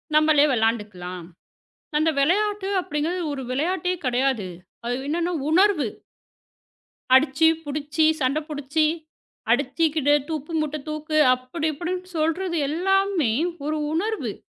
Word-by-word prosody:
நம்மளே 305 -1 +5
விளையாண்டுக்கலாம். 205 -6 -2 0.7
அந்த 315 +1 +3
விளையாட்டு 400 +6 +1
அப்படிங்கறது 325 +4 -2
ஒரு 270 - -5
விளையாட்டே 360 +6 0
கெடையாது. 250 -5 0 0.4
அது 245 +1 -1
என்னன்னா 340 +3 -1 0.2
உணர்வு 355 - +3 1.3
அடிச்சு, 290 +4 +5 0.2
புடிச்சு, 295 +2 -1 0.2
சண்டை 270 +4 +1
புடிச்சு, 295 +1 0 0.7
அடிச்சுக்கிட்டு, 310 -3 +2 0.2
உப்பு 310 +1 -4
மூட்ட 305 0 -2
தூக்கு 305 0 -3 0.2
அப்படி 255 +6 -5
இப்படின்னு 365 +3 -4
சொல்கிறது 335 +2 0
எல்லாமே 380 - +1 0.3
ஒரு 310 0 -1
உணர்வு! 335 - -2
310 Hz, 105 wpm, -24 LUFS, 270-345 Hz, 1.3 s, நம்மளே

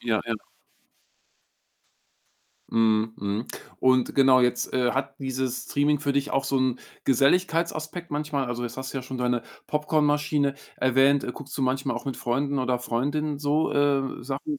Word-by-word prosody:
Ja, 110 -3 0
ja. 115 - 0 2.4
Mhm, 110 0 +2
mhm 100 +3 -3 0.3
und 130 -1 +3
genau, 130 -2 +6
jetzt, 125 0 0
äh, 125 -1 +2
hat 135 0 -3
dieses 130 -1 -2
Streaming 145 0 +1
für 140 -2 0
dich 140 +1 0
auch 135 - +1
so 135 - +1
'n 130 -1 +1 0.3
Geselligkeitsaspekt 165 +4 +1
manchmal? 145 -2 -1
Also 120 0 -3
jetzt 120 0 -5
hast 130 0 -5
du 135 - -2
ja - - -6
schon 130 +1 -6
deine 125 -1 0 0.2
Popcornmaschine 150 -1 +1 0.2
erwähnt. 135 +2 +3
Guckst 140 0 -9
du 135 - -1
manchmal 135 +1 0
auch - - -6
mit 135 -2 -3
Freunden 140 +4 -1
oder 125 -1 0
Freundinnen 145 +5 -1
so, 150 +2 +1
äh, 140 -2 +1
Sachen 140 - -4
135 Hz, 155 wpm, -26 LUFS, 125-145 Hz, 2.4 s, genau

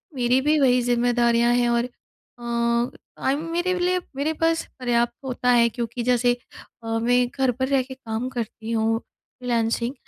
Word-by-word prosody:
मेरी 250 +1 +2
भी 300 +2 +2
वही 250 -2 +4
ज़िम्मेदारियाँ 240 0 +2
हैं। 240 -1 +2
और 235 0 +2
अ, 245 0 -19 0.8
टाइम 280 +4 0
मेरे 350 +2 0
लिए 365 +1 +1 0.2
मेरे 300 +3 -1
पास 325 +1 0
पर्याप्त 240 -1 +1
होता 250 -1 -1
है 235 -1 +5
क्योंकि 235 +1 -4
जैसे 245 0 +3 0.5
अ, - - -8
मैं 245 +1 +3
घर 265 -1 +1
पर 260 +2 -2
रह 270 -1 +2
के 260 +1 -9
काम 240 -1 -4
करती 230 -2 -5
हूँ 225 0 +1
फ्रीलांसिंग 235 -1 -3
245 Hz, 160 wpm, -23 LUFS, 235-265 Hz, 0.8 s, है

